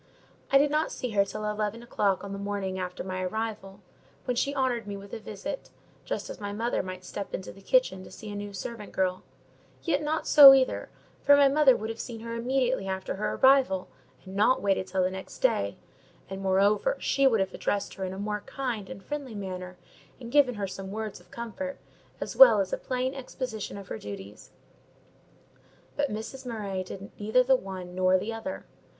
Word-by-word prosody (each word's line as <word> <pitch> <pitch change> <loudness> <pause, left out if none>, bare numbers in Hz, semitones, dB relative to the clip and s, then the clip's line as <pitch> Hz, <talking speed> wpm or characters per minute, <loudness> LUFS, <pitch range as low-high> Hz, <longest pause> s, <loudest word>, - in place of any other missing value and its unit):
I 275 - +7
did 290 +1 +3
not 305 +1 +1
see 250 - -4
her 200 -2 +4
till 210 +2 -5
eleven 210 +2 -2
o'clock 200 -5 0
on 200 0 -6
the 200 - -5
morning 200 -2 -3
after 180 0 -4
my 185 0 -4
arrival; 205 0 -4 0.4
when 250 - 0
she 280 +4 0
honoured 250 -5 0
me 200 -1 -4
with 200 0 -12
a - - -4
visit, 215 +7 -6 0.4
just - - -3
as - - -8
my 205 0 -3
mother 230 +4 -1
might 185 -1 -7
step 200 +2 -5
into 190 - -6
the 195 - -15
kitchen - - +2
to - - -11
see 215 -1 -9
a - - -6
new 205 0 -5
servant 210 +2 -7
girl: 185 -1 0 0.6
yet 300 -4 +1
not 305 +1 -1
so, 275 -2 +11
either, 260 -1 0 0.3
for 285 0 +6
my 285 -1 +7
mother 275 -2 +5
would 220 +1 -4
have 225 - -9
seen 230 -3 -6
her 230 0 -5
immediately 250 -2 0
after 190 0 -3
her 210 - -1
arrival, 260 -9 +4 0.4
and 190 +1 -9
not 215 +6 +4
waited 195 -2 +1
till 185 0 0
the 185 - +1
next 190 0 -8
day; 100 0 +1 0.5
and, 195 0 -5
moreover, 200 - +2
she 275 -1 +3
would 225 -5 +3
have 190 -1 -1
addressed 205 -1 -2
her 190 - -6
in 185 - -2
a 190 - -7
more 210 +1 -2
kind 250 -7 -3
and 190 +2 -9
friendly 285 -6 -5
manner, 185 -2 -6 0.4
and 235 -2 -8
given 270 -3 +4
her 205 -1 -2
some 195 0 -7
words 215 0 -5
of - - -22
comfort 235 +4 -5 0.4
as - - -5
well - - +9
as - - -1
a - - +1
plain 255 - -2
exposition 255 -6 -5
of 195 -2 -10
her 110 - -5
duties; 100 0 -9 1.5
but 285 -1 0
Mrs. 220 +5 -6
Murray 205 -6 -3
did 195 +2 -9
neither 220 +5 +3
the 265 +1 +5
one 185 -5 -6
nor 185 0 +4
the 225 +5 -3
other. 255 +6 -6
210 Hz, 205 wpm, -28 LUFS, 190-255 Hz, 1.5 s, so